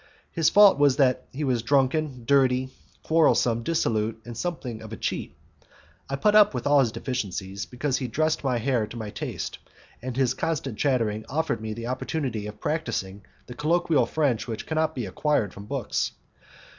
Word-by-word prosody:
His 165 -2 +3
faults 205 -6 +7
were 145 0 +6
that 130 -2 +2
he 145 +4 -4
was 125 -4 +1
drunken, 135 +1 +1
dirty, 130 -1 +3 0.3
quarrelsome, 145 -7 +3
dissolute, 115 -6 0
and 120 - -7
somewhat 125 -6 -4
of 110 -1 -10
a 110 - -6
cheat. - - -3 0.7
I 135 - -1
put 205 +10 +2
up 210 -1 +6
with - - -3
all 145 0 +5
his 120 -5 +3
deficiences, 100 -7 -4
because 130 +7 -1
he 130 - -3
dressed 155 +7 0
my 130 -3 +1
hair 115 -2 0
to 120 - -9
my 110 -2 -5
taste, - - -5 0.4
and 125 0 -5
his 130 -2 +2
constant 140 -6 -3
chattering 115 -6 +1
offered 160 -4 -1
me 110 -1 -4
the 115 0 -6
opportunity 125 -3 -3
of 105 - -9
practising 100 -11 -3 0.2
the 125 - -9
colloquial 155 -2 +2
French 135 -7 0
which 115 -2 -5
cannot 160 0 0
be 125 -4 -3
acquired 105 0 0
from 100 - -10
books. - - -2
130 Hz, 175 wpm, -26 LUFS, 115-150 Hz, 0.7 s, faults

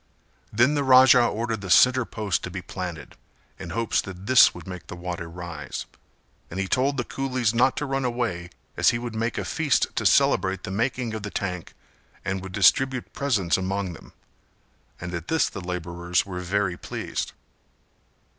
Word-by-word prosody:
Then 120 +7 +3
the 145 -1 +1
Raja 130 -1 +7
ordered 115 -1 -1
the 95 - -7
centre 130 +6 +5
post 105 -6 -2
to - - -4
be - - -6
planted 85 -4 -7 0.4
in 95 -3 -7
hopes 115 +5 0
that 95 0 -9
this 130 +1 +7
would 90 -2 -11
make 90 -2 -8
the - - -7
water 85 -1 -5
rise; 85 -3 -6 0.6
and 95 - -5
he 95 - -1
told 135 +6 +1
the 120 - 0
coolies 130 -4 -1
not 130 +3 +3
to 150 - -1
run 135 -1 -1
away 120 -8 -2 0.3
as - - +4
he 120 - +1
would 120 -1 -5
make 115 +2 -2
a - - -2
feast 150 -5 0
to - - -1
celebrate 95 0 +3
the - - -5
making 115 +2 -1
of 110 - -4
the 105 - -5
tank 90 -4 -4 0.5
and 95 0 -2
would 95 0 -8
distribute 125 +6 +2
presents 110 -12 +1
among 95 0 -2
them, 80 - -14 0.9
and 90 +1 -6
at 85 -1 -5
this 160 - +2
the 95 - -7
labourers 90 0 -2
were 90 -2 -6
very 90 0 -1
pleased. - - -5
100 Hz, 180 wpm, -25 LUFS, 90-125 Hz, 0.9 s, Raja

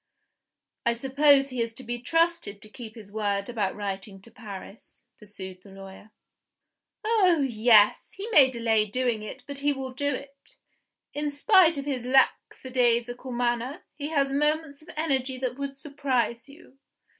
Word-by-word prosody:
"I 235 - +2
suppose 275 +3 +4
he 250 -2 -2
is 230 0 -2
to 260 - -9
be 240 0 -4
trusted 330 -8 0
to 215 - -12
keep 225 0 -10
his 210 -3 -12
word 200 -1 -1
about 210 -5 -1
writing 195 -1 -5
to 230 - -16
Paris?" 210 -1 -11
pursued 190 -3 -10
the 200 - -16
lawyer. 195 +2 -12 0.9
"Oh, 375 -9 +3
yes! 220 -3 +4
He 395 +3 -7
may 275 -10 +7
delay 225 -3 +1
doing 240 0 -1
it 215 - -8
but 280 -1 -5
he 290 +1 +1
will 265 -1 -6
do 285 +2 -1
it. 275 +1 -12 0.6
In 295 0 -2
spite 330 +2 +4
of 280 - -4
his 255 -4 -3
lackadaisical 250 -1 +1
manner, 240 +3 -1
he 290 -1 -5
has 280 -3 0
moments 300 0 0
of 310 - -17
energy 265 -4 0
that 255 -1 -3
would 280 0 -4
surprise 275 -4 -2
you. 280 -2 -17
255 Hz, 155 wpm, -26 LUFS, 220-285 Hz, 0.9 s, may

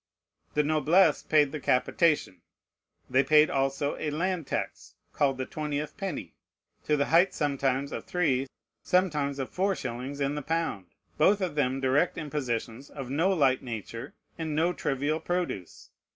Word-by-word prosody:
The 150 - +3
noblesse 155 +5 +3
paid 150 -3 +3
the 155 - -4
capitation. 135 - +1 0.7
They 130 +2 +3
paid 150 +2 +5
also 135 +1 0
a 155 - -2
land 170 +1 -2
tax, - - -4 0.2
called 135 -2 +1
the 130 - -3
twentieth 150 0 -4
penny, 175 - -5 0.5
to 150 - +2
the 140 - +2
height 180 +3 +5
sometimes 140 -1 0
of - - -5
three, 140 -7 +1 0.3
sometimes 150 -7 +1
of 135 -2 -4
four 195 +1 +1
shillings 130 +2 -5
in 140 0 0
the 150 - -3
pound: 160 - -2 0.3
both 205 +1 +5
of 185 -5 -2
them 135 -3 0
direct 135 +6 +2
impositions, 135 -5 -3
of 135 -3 -7
no 165 +7 +2
light 140 -8 +3
nature, 115 -1 -7 0.2
and 160 -2 -2
no 170 +3 +2
trivial 145 +2 -1
produce. 175 - -4
145 Hz, 150 wpm, -28 LUFS, 135-160 Hz, 0.7 s, paid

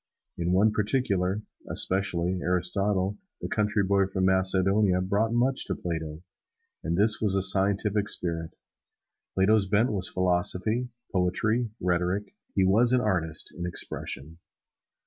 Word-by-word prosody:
In 85 +1 -2
one 100 +4 +4
particular, 105 -3 0 0.3
especially, 95 -1 -1
Aristotle, 95 +2 -1 0.2
the - - -5
country 105 -1 0
boy 100 0 +2
from 95 -1 -1
Macedonia, 95 +1 +2
brought 100 +4 0
much 125 +3 +1
to - - -2
Plato 80 -2 -5 0.6
and 85 +1 -1
this 105 +1 +3
was 100 -3 +1
the 95 - +2
scientific 100 +2 +2
spirit. 80 -4 -1 0.8
Plato's 95 +1 +3
bent 110 +5 +2
was 95 -3 +1
philosophy, 95 +6 0 0.2
poetry, 110 +6 0
rhetoric 90 +3 -1 0.2
he 95 - +3
was 115 +6 +3
an 125 - +3
artist 85 -7 -2
in 90 0 -4
expression. 80 -2 -3
95 Hz, 125 wpm, -27 LUFS, 90-105 Hz, 0.8 s, one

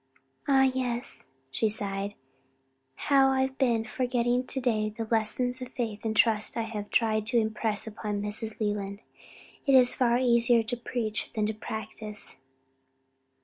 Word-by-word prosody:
"Ah 270 -1 +5
yes," 255 - -1 0.2
she 215 +11 +1
sighed, 200 -1 -2 0.8
"how 270 -1 +3
I 265 0 +1
have 265 0 -2
been 235 -4 +2
forgetting 245 +1 0
to 265 - -1
day 220 -4 0
the 225 +2 -5
lessons 245 +3 0
of 255 - -5
faith 220 -4 -4
and 220 -1 -2
trust 215 -1 +3
I 230 - 0
have 215 -2 -6
tried 215 -2 +1
to 240 +1 +3
impress 220 -1 0
upon 210 -1 -4
Mrs. 210 +2 -2
Leland. 205 -1 -3 0.7
It 275 - +5
is 250 -1 +7
far 240 -3 +2
easier 235 -1 +4
to 235 +3 -3
preach 235 -3 -3
than 215 -1 +1
to 215 - -1
practice." 215 0 -6
225 Hz, 150 wpm, -28 LUFS, 215-250 Hz, 0.8 s, is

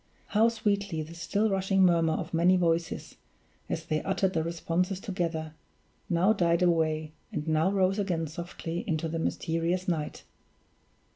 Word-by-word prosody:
how 220 +2 +4
sweetly 200 -7 -1
the 160 +2 -10
still 200 +6 0
rushing 195 -1 +2
murmur 165 -3 +4
of 170 0 -4
many 175 +3 +4
voices, 170 -1 -1 0.5
as - - -3
they 155 0 0
uttered 190 -1 0
the 160 - +1
responses 170 +3 -1
together, 170 -6 -3 0.6
now 180 +5 +4
died 170 -3 +2
away, 155 -3 +1 0.2
and 150 +1 -4
now 160 +3 +3
rose 195 0 +2
again 175 -5 0
softly 170 +1 -5
into 165 0 0
the 165 +1 -3
mysterious 165 +3 -1
night! 160 -4 -2
170 Hz, 145 wpm, -29 LUFS, 165-190 Hz, 0.6 s, how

